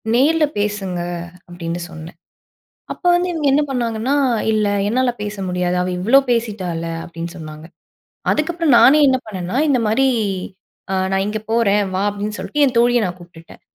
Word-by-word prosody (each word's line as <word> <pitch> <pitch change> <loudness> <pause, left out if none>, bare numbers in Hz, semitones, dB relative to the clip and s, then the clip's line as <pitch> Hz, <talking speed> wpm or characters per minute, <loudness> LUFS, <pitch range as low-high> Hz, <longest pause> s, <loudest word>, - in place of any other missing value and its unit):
"நேர்ல 305 +5 +4
பேசுங்க" 205 -3 -2 0.5
அப்படின்னு 175 -1 -5
சொன்னேன். 160 +1 -10 0.8
அப்போ 360 - -4
வந்து 355 +1 0
இவங்க 310 -3 -1
என்ன 295 +2 +3
பண்ணாங்கன்னா 240 +1 -1 0.4
"இல்ல, 215 -1 +1 0.2
என்னால 250 +2 +1
பேச 210 0 -5
முடியாது 180 0 -1
அவ 180 - -1
இவ்வளோ 235 +9 +5
பேசிட்டால்ல" 195 -8 -2 0.2
அப்படின்னு 170 0 -7
சொன்னாங்க. 155 -1 -9 0.7
அதுக்கப்புறம், 325 -2 +1
நானே 285 +4 +7
என்ன 260 -1 +3
பண்ணேன்னா, 190 0 -5
இந்த 275 -3 +3
மாரி 230 +6 +2 0.9
அ - - +1 0.2
"நான் 195 0 +1
இங்கே 215 0 -4
போறேன் 210 -3 +3
வா" 190 - 0
அப்படின்னு 205 +1 -4
சொல்லிட்டு 295 - -1
என் 255 -3 -2
தோழியை 240 +1 +4
நான் 180 0 -6
கூப்டுட்டேன். 170 -1 -15
210 Hz, 155 wpm, -19 LUFS, 180-255 Hz, 0.9 s, நானே